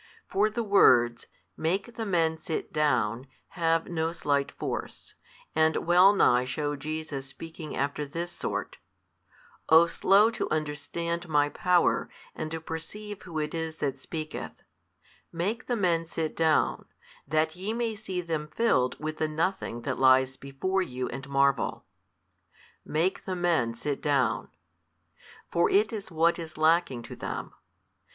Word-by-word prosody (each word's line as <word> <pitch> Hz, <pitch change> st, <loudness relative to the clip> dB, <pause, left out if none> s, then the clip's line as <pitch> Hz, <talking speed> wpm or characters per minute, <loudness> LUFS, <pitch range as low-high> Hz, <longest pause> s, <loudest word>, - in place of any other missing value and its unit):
For 210 Hz, +2 st, +2 dB
the 230 Hz, +2 st, -2 dB
words 120 Hz, -, +4 dB, 0.3 s
Make 190 Hz, +8 st, -2 dB
the 225 Hz, -1 st, -3 dB
men 165 Hz, -4 st, +1 dB
sit 160 Hz, -, -4 dB
down 135 Hz, -5 st, +1 dB, 0.2 s
have 165 Hz, -1 st, +1 dB
no 165 Hz, -1 st, -1 dB
slight 140 Hz, -4 st, 0 dB
force, -, -, -5 dB, 0.4 s
and 160 Hz, 0 st, +3 dB
wellnigh 175 Hz, -8 st, +5 dB
shew 145 Hz, +3 st, -2 dB
Jesus 150 Hz, -1 st, -5 dB
speaking 160 Hz, +2 st, -8 dB
after 140 Hz, +2 st, -1 dB
this 170 Hz, +5 st, -4 dB
sort, -, -, -4 dB, 0.9 s
O 160 Hz, +1 st, +8 dB
slow 200 Hz, +6 st, +4 dB
to 225 Hz, -, -3 dB
understand 170 Hz, +3 st, -3 dB
My 145 Hz, -1 st, +3 dB
Power, 180 Hz, +2 st, +2 dB, 0.2 s
and 155 Hz, -, -4 dB
to 160 Hz, +1 st, -4 dB
perceive 190 Hz, +6 st, -7 dB
Who 170 Hz, -3 st, -7 dB
it 150 Hz, -1 st, -2 dB
is 160 Hz, -1 st, -3 dB
that 135 Hz, -4 st, -2 dB
speaketh, 155 Hz, +1 st, -6 dB, 0.7 s
Make 200 Hz, +8 st, -2 dB
the 245 Hz, -, +1 dB
men 170 Hz, -5 st, +1 dB
sit 160 Hz, -1 st, -3 dB
down, 160 Hz, -2 st, +2 dB, 0.4 s
that 155 Hz, +1 st, +1 dB
ye 190 Hz, +4 st, -3 dB
may 230 Hz, 0 st, -1 dB
see 195 Hz, -4 st, -4 dB
them 160 Hz, -3 st, -3 dB
filled 130 Hz, -, +1 dB
with 155 Hz, +1 st, -4 dB
the 155 Hz, -, 0 dB
nothing 155 Hz, -6 st, -2 dB
that 130 Hz, -1 st, -2 dB
lies 130 Hz, 0 st, +5 dB
before 140 Hz, +9 st, -2 dB
you 130 Hz, -7 st, -3 dB
and 135 Hz, +2 st, -7 dB
marvel. 140 Hz, -6 st, +1 dB, 1.0 s
Make 165 Hz, +5 st, -1 dB
the 185 Hz, -, -2 dB
men 165 Hz, -10 st, +1 dB
sit 140 Hz, +4 st, -3 dB
down. 145 Hz, -2 st, +1 dB, 1.0 s
For 170 Hz, -, +3 dB
it 215 Hz, +3 st, +3 dB
is 205 Hz, -3 st, -5 dB
what 170 Hz, +1 st, +2 dB
is 160 Hz, -2 st, -7 dB
lacking 155 Hz, -6 st, +2 dB
to -, -, -9 dB
them. -, -, -5 dB
160 Hz, 145 wpm, -28 LUFS, 145-180 Hz, 1.0 s, O